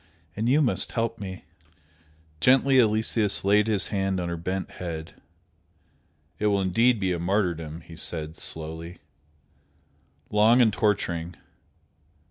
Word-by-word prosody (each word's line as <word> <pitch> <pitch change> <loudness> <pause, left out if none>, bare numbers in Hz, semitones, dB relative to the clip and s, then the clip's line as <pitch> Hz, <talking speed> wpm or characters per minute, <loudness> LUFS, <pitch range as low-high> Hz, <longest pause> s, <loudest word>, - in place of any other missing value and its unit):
And 110 +3 -1
you 150 +4 +4
must 125 - 0
help 115 -1 -2
me!" 95 -3 -7 0.9
Gently 130 - +4
Aloysius 110 -3 +2
laid 105 +2 +4
his 105 -3 +1
hand 95 -1 0
on 85 -1 -3
her 85 - -2
bent 90 +3 -4
head. 80 -3 -6 1.3
"It 105 - +1
will 100 -1 +2
be 115 +7 +3
indeed 100 -7 +1
a 85 - -3
martyrdom!" 85 -4 -1
he 80 - -13
said, 80 -1 -3
slowly, 80 +2 -6 1.3
"Long 110 +4 +5
and 115 -4 +4
torturing! 90 -4 -1
95 Hz, 125 wpm, -25 LUFS, 85-110 Hz, 1.3 s, Long